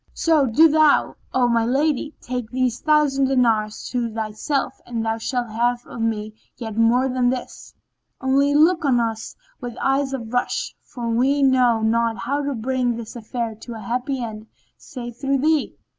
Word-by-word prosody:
So, 310 -5 +3
do 300 +8 +6
thou, 310 -1 +3 0.2
O 250 -1 +2
my 235 -1 +2
lady, 290 +4 0
take 250 -3 -4
these 250 -1 -1
thousand 300 -3 +3
dinars 230 -5 +1
to 240 -2 -2
thyself 225 +5 -3
and 230 -2 -3
thou 225 0 -1
shalt 240 -1 -2
have 240 +2 0
of 235 - -8
me 215 -1 -2 0.2
yet 225 -4 -6
more 235 +3 +3
than 250 -1 +1
this; 250 -1 -6 0.4
only 275 +2 +2
look 330 +3 +4
on 260 -4 +3
us 225 -1 -3 0.2
with 245 -2 -7
eyes 270 0 +1
of 240 -4 -5
rush; 245 - -1
for 240 -2 -6
we 265 +5 +2
know 250 -4 +3
not 230 +1 +1
how 280 +5 -2
to 285 -1 -2
bring 245 +1 -1
this 230 0 -8
affair 235 0 -4
to 225 +2 -9
a - - -7
happy 245 +4 -2
end 220 -1 -7 0.3
save 240 -2 -9
through 275 +1 0
thee." 305 +2 +1
245 Hz, 175 wpm, -22 LUFS, 230-270 Hz, 0.4 s, do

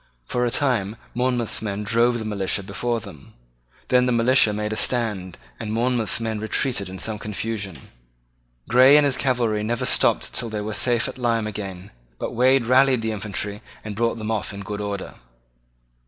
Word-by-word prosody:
For 125 - 0
a - - +1
time 115 -6 0 0.2
Monmouth's 125 -2 0
men 105 -1 -3
drove 115 +3 +2
the 110 - -5
militia 100 -2 -1
before 115 +4 -2
them. 75 -9 -13 0.5
Then 125 0 +4
the - - +2
militia 120 -1 +4
made 105 +1 -2
a - - -2
stand, 105 -6 -1 0.2
and 105 - -4
Monmouth's 120 0 0
men 110 -2 -2
retreated 110 -1 -1
in 95 - -7
some 105 +3 -2
confusion. 105 -2 -5 0.8
Grey 130 +4 +7
and 150 - +5
his 140 -2 +2
cavalry 120 -5 0
never 120 +4 -1
stopped - - +2
till 115 - -1
they 105 -1 -3
were 105 +1 -4
safe 120 +2 +2
at - - -8
Lyme 115 -3 +1
again: 100 -3 -6 0.3
but - - -4
Wade 130 +1 +3
rallied 130 -1 +4
the 110 - -1
infantry 105 0 -4 0.2
and 105 -1 -6
brought 115 +2 0
them 110 0 -3
off 105 -3 -2
in 100 - -7
good 105 +1 -5
order. 100 -1 -4
110 Hz, 180 wpm, -23 LUFS, 105-120 Hz, 0.8 s, Grey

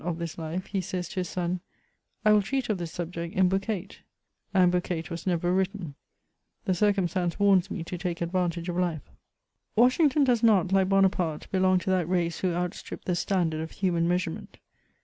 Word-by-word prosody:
of 170 -1 -2
this 170 -1 -5
life, 165 +3 -4
he 195 -2 -2
says 180 0 -4
to 190 - -4
his 180 -2 -2
son: 180 0 -2 0.3
" - - -41
I 215 - +7
will 210 - +5
treat 265 +6 -2
of 205 -4 0
this 170 -2 -4
subject 170 0 -5
in 185 -1 +4
Book 195 +1 0
VIII. 200 -4 -3 0.3
;*' - - -51
and 185 -2 +4
Book 180 0 0
VIII. 165 -3 -2
was 170 +3 -6
never 175 0 +1
written; 190 -4 -1 0.7
the 190 - +2
circumstance 180 -3 +1
warns 195 -3 +4
me 175 - -4
to 175 +1 -6
take 175 -2 -3
advantage 175 0 -1
of 175 -1 -2
life. 170 -5 -2 0.6
Washington 265 +5 +4
does 245 -4 +3
not, 200 -5 +4
like 190 -1 +3
Bonaparte, 185 -5 +2
belong 185 -1 +3
to 185 +1 -1
that 180 -3 +1
race 175 -2 0
who 185 - 0
outstrip 175 +1 -4
the 180 - 0
standard 170 -4 0
of 160 - -5
human 170 -3 0
measurement. 180 +2 -2
180 Hz, 200 wpm, -27 LUFS, 170-195 Hz, 0.7 s, I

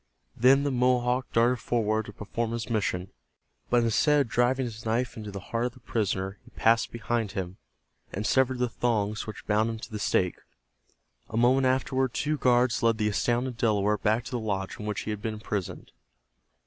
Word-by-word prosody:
Then 135 +4 +5
the 145 - 0
Mohawk 125 0 +1
darted 120 +2 +3
forward 110 -2 0
to - - -7
perform 115 +3 -3
his 115 0 -4
mission, 90 -4 -1 0.6
but 120 -1 +3
instead 145 +6 +3
of 130 - -2
driving 125 +3 +2
his 110 -2 -7
knife 115 +3 -1
into 105 -2 -7
the 100 -1 -6
heart 115 +1 +1
of 125 - -3
the 130 - -16
prisoner 100 -4 -2
he - - -17
passed 115 +2 +3
behind 115 -2 -2
him, 95 -2 -4 0.5
and 105 +2 -4
severed 130 +2 +2
the 125 0 +1
thongs 110 -3 -1
which 110 - -8
bound 110 +2 +2
him 115 - -4
to 120 +2 -9
the 105 - -4
stake. 90 -3 +1 0.9
A 110 - -4
moment 130 +3 +4
afterward 130 -1 0
two 150 0 -1
guards 125 -1 +3
led 115 -1 +3
the 105 -1 +1
astounded 120 +4 0
Delaware 105 -2 +2
back 110 +3 +1
to - - -9
the 125 - -1
lodge 100 -3 -3
in 105 - -5
which 105 - -2
he 110 - -4
had 105 -1 -5
been 110 0 -3
imprisoned. 105 -3 -5
115 Hz, 195 wpm, -27 LUFS, 105-125 Hz, 0.9 s, Then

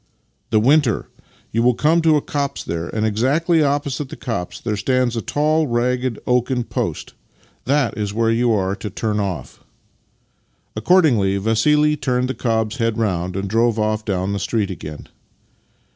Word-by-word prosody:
" - - -44
" - - -47
The 110 - +3
vv'inter. 130 -1 +3 0.5
You 115 - +1
will 125 0 +3
come 160 +5 +3
to 160 -2 +4
a 145 - -2
copse 140 -1 -3
there, 85 0 -4
and 110 0 -1
exactly 145 - +2
opposite 145 -1 -1
the - - -7
copse 115 -8 -4
there 110 -2 -2
stands 125 +3 0
a 115 - -1
tall, 155 +4 +1
ragged 125 0 0
oaken 125 0 +1
post. - - -4 0.5
That 140 -2 +1
is 105 -2 -2
where 115 +1 +1
j'ou 120 +1 +2
are 95 0 -1
to 105 - -5
turn 105 +2 -2
off." 95 -9 -4 1.2
Accordingly 120 - +3
Vassili 150 +9 +2
turned 125 -2 -1
the - - -1
cob's 110 -1 -1
head 115 -2 0
round, 90 -5 -1
ajad 100 0 -2
drove 115 +1 +2
off 110 0 0
down 100 -1 -1
the 100 - -2
street 100 0 -1
again. 75 -4 -8
115 Hz, 170 wpm, -20 LUFS, 105-135 Hz, 1.2 s, to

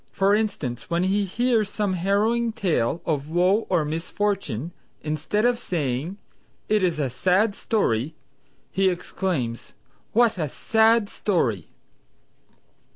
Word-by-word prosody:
For 195 +1 +2
instance 195 - -2
when 170 +1 +1
he 200 +2 +1
hears 225 +1 +1
some 205 -3 -1
harrowing 215 +6 +1
tale 170 - 0
of 150 -2 -1
woe 180 +6 +2
or 155 - +2
misfortune 165 - -2 0.3
instead 155 +8 -1
of 245 -1 +2
saying, 155 - -2 0.5
"It 215 -1 +2
is 175 -4 +1
a 145 -3 0
sad 185 - +2
story" 155 - 0 0.6
he 190 0 +3
exclaims 170 -9 -3 0.4
"What 230 -4 +3
a 155 -3 -1
sad 220 - +3
story!" 125 - -1
185 Hz, 120 wpm, -24 LUFS, 155-210 Hz, 0.6 s, he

